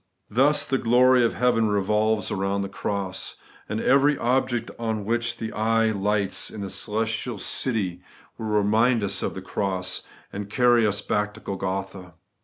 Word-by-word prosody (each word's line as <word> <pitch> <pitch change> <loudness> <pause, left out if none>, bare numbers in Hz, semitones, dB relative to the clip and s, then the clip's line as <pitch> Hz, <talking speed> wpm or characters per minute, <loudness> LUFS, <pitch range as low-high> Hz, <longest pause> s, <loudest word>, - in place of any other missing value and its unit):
Thus 135 +7 +3
the 135 - 0
glory 125 +1 +4
of 115 - +1
heaven 115 -2 +2
revolves 105 +1 +1
round 100 +1 -1
the 100 - -5
cross; 95 -1 -4 0.3
and 110 +1 -2
every 140 +4 +3
object 120 -1 0
on 110 -3 -2
which 115 +1 -1
the 110 -1 -5
eye 115 +1 +2
lights 100 -1 0
in 105 - -8
the 100 - -4
celestial 115 +2 -2
city 95 -4 0 0.3
will 110 - -6
remind 110 +3 +2
us 100 - -1
of - - -3
the - - -7
cross, 95 -2 -2 0.3
and 100 0 -5
carry 120 0 +4
us 105 0 -1
back 105 0 -1
to - - -11
Golgotha. 95 -3 -5
110 Hz, 160 wpm, -24 LUFS, 100-120 Hz, 0.3 s, glory